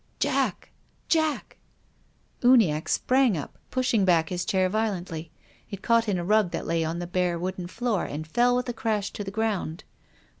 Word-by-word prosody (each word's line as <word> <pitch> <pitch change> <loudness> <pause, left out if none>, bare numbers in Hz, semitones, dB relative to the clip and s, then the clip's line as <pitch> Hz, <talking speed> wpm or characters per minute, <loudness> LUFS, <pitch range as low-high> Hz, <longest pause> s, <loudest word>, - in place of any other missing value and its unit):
" - - -39
Jack! - - -1 0.4
Jack! 315 -3 0 0.4
" - - -39
Uniacke 220 -12 +4
sprang 255 -7 +2
up, 145 - -7
pushing 250 -5 +1
back 170 -4 +3
his 180 -1 -2
chair 185 -1 +2
vio 215 +3 0
lently. 165 -2 -7 0.4
It 200 -1 -8
caught 230 -1 +3
in 195 - +1
a 175 - -3
rug 210 -1 +3
that - - -4
lay 165 0 0
on 160 +1 -2
the 175 - -4
bare 175 -1 0
wooden 180 +1 -4
floor 225 +1 -1
and 155 +2 -5
fell 240 +9 +2
with 250 0 -1
a 245 - -2
crash 215 -3 -1
to 205 - -5
the 195 - -5
ground. 200 -6 -2
195 Hz, 190 wpm, -26 LUFS, 175-230 Hz, 0.4 s, Uniacke